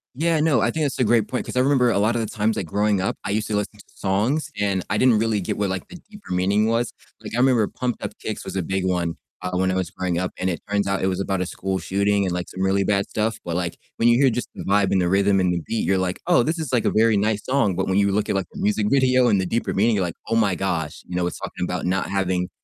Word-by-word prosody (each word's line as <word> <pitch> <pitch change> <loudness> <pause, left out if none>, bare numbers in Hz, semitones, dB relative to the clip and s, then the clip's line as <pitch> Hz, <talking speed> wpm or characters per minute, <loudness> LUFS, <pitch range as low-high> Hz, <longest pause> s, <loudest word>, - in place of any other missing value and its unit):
Yeah, 165 +2 +1
no, 155 -4 +3
I - - +2
think 160 - -1
that's 140 - -3
a 125 - +4
great 110 -1 +3
point 125 - -3
'cause - - -7
I - - +5
remember 130 -2 +3
a 110 - +1
lotta 110 +4 +2
the 110 - -1
times, 110 +1 0
like 90 - -3
growing 105 +2 +1
up, - - -1
I 100 - -3
used 105 0 -1
to 110 - -1
listen 105 +1 -3
to - - -13
songs 105 +11 0
and 100 -3 0
I 105 - +1
didn't 125 -4 +5
really 110 -2 +1
get - - -3
what 100 -1 0
like 95 - -4
the - - -12
deeper 205 - -8
meaning 100 +4 +2
was, 115 +1 0 0.3
like, - - -8
I - - -1
remember 125 -5 +4
Pumped 125 -2 -4
Up - - -3
Kicks - - -5
was - - -6
a 95 - 0
big 95 +2 -2
one, 85 -2 0 0.3
uh, 90 - -3
when 95 0 +1
I - - -1
was 95 -3 -1
growing 90 -2 -2
up, 90 0 -2
and 95 - -1
it 85 - -5
turns 100 -1 0
out 95 0 0
it 95 - +1
was 95 0 -1
about 95 -1 -1
a 90 - 0
school 95 +1 -3
shooting 100 +1 +1
and 90 - -1
like 90 0 -3
some 95 - -7
really 95 +1 +2
bad 100 0 0
stuff, 110 +1 -1
but 85 -1 -3
like 85 -1 -2 0.2
when 115 - +3
you 120 +3 +5
hear 135 - +6
just 125 +1 -3
the - - -7
vibe 100 -1 +2
and 95 -2 +3
the 90 - +1
rhythm 100 0 +3
and 90 -1 +2
the 85 - -1
beat, 115 - -1
you're 95 +3 +2
like, 95 0 -1
"Oh, 175 -9 +5
this 165 +4 -1
is 155 -5 -4
like 120 -3 +1
a - - +3
very 110 0 +3
nice 105 +1 0
song." 130 -8 +1
But 95 +1 -1
when 95 - +1
you 100 0 +3
look 105 +1 0
at - - +1
like 95 - 0
the - - -8
music 105 0 +1
video 130 -2 +4
and 100 - +3
the 95 - -2
deeper 115 +6 -1
meaning, 110 +3 +3
you're 95 - +1
like, 85 - -5
"Oh 115 - +1
my 110 -4 +3
gosh," 85 -5 -2
you 90 - -6
know, 90 - +1
it's 90 - -4
talking - - -5
about 90 0 -2
not 95 +1 0
having 95 -2 0
100 Hz, 310 wpm, -23 LUFS, 95-115 Hz, 0.3 s, hear